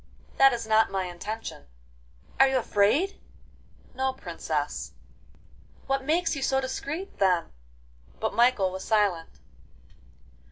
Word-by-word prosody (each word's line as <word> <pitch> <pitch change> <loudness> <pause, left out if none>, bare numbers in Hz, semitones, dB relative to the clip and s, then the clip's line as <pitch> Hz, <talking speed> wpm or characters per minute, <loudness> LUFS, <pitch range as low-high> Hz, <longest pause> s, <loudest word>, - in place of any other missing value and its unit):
'That 270 0 +8
is 235 -2 -3
not 220 0 +3
my 195 -1 -1
intention.' 180 - -6 0.7
'Are 270 - +8
you 265 - +1
afraid?' 255 - +1 0.7
'No, 265 +1 -1
Princess.' 265 - -4 0.9
'What 270 0 -1
makes 330 +2 +1
you 280 - -4
so 265 0 +2
discreet, 280 +8 -5
then?' 180 - +2 0.7
But - - -1
Michael 235 -6 +3
was 190 +1 -6
silent. 200 -7 +1
240 Hz, 115 wpm, -27 LUFS, 200-270 Hz, 0.9 s, That